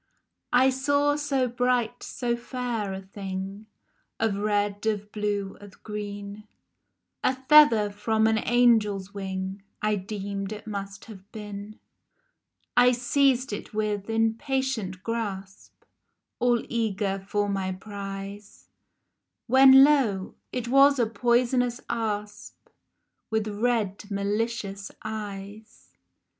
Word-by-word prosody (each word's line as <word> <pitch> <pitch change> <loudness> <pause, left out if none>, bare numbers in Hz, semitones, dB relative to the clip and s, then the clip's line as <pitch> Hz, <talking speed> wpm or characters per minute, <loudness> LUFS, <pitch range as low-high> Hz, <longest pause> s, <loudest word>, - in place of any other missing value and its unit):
I 260 +2 +5
SAW 285 +2 +2
so 280 -3 0
bright, 245 -1 0
so 240 -2 -2
fair 240 -4 -3
a 190 0 -6
thing, 195 +1 -6 0.5
Of 220 -3 +1
red, 205 -1 0
of 210 -1 -1
blue, 205 -2 -2
of 205 -2 -15
green, 205 0 -6 0.8
A 260 - +2
feather 260 -6 +6
from 220 +2 +1
an 220 0 +3
angel's 215 -5 +2
wing 190 0 -4 0.2
I 215 0 +1
deemed 200 0 -5
it 210 0 -9
must 200 -2 -6
have 200 -2 -13
been. 210 0 -8 1.0
I 250 0 +6
seized 255 0 +2
it, 205 - -7
with 210 -1 -1
impatient 225 -3 -1
grasp, 200 -4 -5 0.6
All 240 -1 +2
eager 205 -4 -1
for 205 0 +1
my 195 -1 -1
prize, 200 +1 -8 0.8
When, 265 +2 +8
lo! 245 -10 +2 0.2
it 245 -2 -3
was 275 +3 +6
a 240 - +3
poisonous 240 +1 +1
asp 210 -3 -4 0.6
With 220 -1 0
red 210 -2 -1
malicious 200 0 -2
eyes 210 0 -8
215 Hz, 110 wpm, -26 LUFS, 200-240 Hz, 1.0 s, When